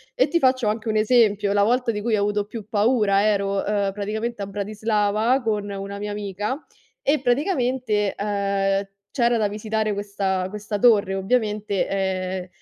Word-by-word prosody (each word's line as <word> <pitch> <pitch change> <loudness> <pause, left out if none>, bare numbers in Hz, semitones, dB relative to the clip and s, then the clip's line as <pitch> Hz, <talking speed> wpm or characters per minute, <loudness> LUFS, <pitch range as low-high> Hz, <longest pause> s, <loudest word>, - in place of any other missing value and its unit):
E - - +2
ti 340 - +2
faccio 255 -4 +2
anche 220 +1 -1
un 215 - 0
esempio, 215 -3 +3
la 205 - +3
volta 240 +3 +2
di 210 -2 -4
cui 225 0 +1
ho 200 - 0
avuto 205 0 0
più 215 -1 -8
paura 210 -2 +2
ero, 200 -2 +1
ehm, 200 -1 0
praticamente 215 +2 -3
a 195 - -3
Bratislava 215 +4 0
con 210 -2 -1
una 200 0 -6
mia 210 0 -4
amica 205 +6 -4 0.4
e 285 -1 +2
praticamente, 250 - 0
ehm, 200 -1 0 0.2
c'era 240 -1 +2
da 215 -2 +1
visitare 215 +1 -2
questa 200 -2 -2
questa 210 +1 -4
torre. 205 -4 +4
Ovviamente, 210 0 0
ehm, 185 -1 -2
210 Hz, 160 wpm, -23 LUFS, 200-230 Hz, 0.4 s, torre